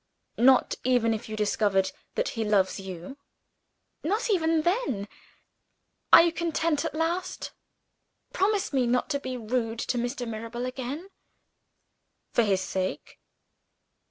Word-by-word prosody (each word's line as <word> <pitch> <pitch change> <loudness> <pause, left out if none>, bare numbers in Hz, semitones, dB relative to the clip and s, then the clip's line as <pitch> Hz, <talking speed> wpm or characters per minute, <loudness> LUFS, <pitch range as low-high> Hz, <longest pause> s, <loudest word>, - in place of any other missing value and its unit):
"Not 255 +2 +5
even 245 -3 +3
if 215 0 -5
you 215 - -4
discovered 205 -2 +1 0.2
that - - 0
he 225 - -2
loves 200 -3 +2
you?" 190 +8 -8 0.8
"Not 425 +8 0
even 325 -4 +2
then. 345 - 0 1.0
Are - - +10
you 340 - +2
content 330 -3 0
at - - -3
last? 335 +3 -2 0.8
Promise 395 -2 +1
me 255 -3 +2
not 245 +1 +1
to 280 - 0
be 260 -2 -5
rude 230 0 -2
to 245 - -1
Mr. 245 +1 -3
Mirabel 230 +2 -5
again." 265 +8 -5 1.2
"For - - +4
his 195 -4 +2
sake?" 185 0 -4
250 Hz, 130 wpm, -27 LUFS, 220-325 Hz, 1.2 s, Are